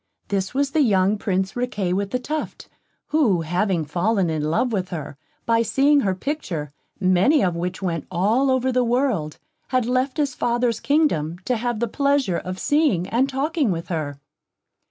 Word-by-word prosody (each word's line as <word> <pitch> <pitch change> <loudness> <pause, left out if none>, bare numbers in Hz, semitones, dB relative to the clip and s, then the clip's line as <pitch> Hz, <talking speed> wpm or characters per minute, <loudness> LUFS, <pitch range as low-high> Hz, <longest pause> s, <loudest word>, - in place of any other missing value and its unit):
This 195 +2 -2
was 280 0 +1
the 310 - +2
young 200 -5 +3
Prince 190 -1 -1
Riquet 210 -7 -1
with 200 +1 -1
the 250 - 0
Tuft, 300 +5 -5 0.4
who 245 - +2
having 175 +1 0
fallen 180 +3 0
in 155 -1 -1
love 165 +11 +1
with 185 -3 -1
her, 155 -4 -6 0.3
by 230 0 +3
seeing 280 +5 +3
her 195 -8 0
picture, 185 - -4 0.3
many 190 - +3
of 180 -3 +1
which 180 +3 -4
went 165 -4 -2
all 220 +10 +2
the 255 0 +1
world 235 - 0
over, - - -45 0.2
had 255 -2 +1
left 255 +3 0
his 285 -3 0
father's 240 -2 0
kingdom, 230 - +1
to 250 - +1
have 240 -1 -2
the 235 - 0
pleasure 280 -6 +1
of 185 0 -6
seeing 285 - +1
and 260 +4 +1
talking 280 0 0
with 170 -2 -3
her. 150 -5 -3
215 Hz, 175 wpm, -22 LUFS, 180-260 Hz, 0.4 s, young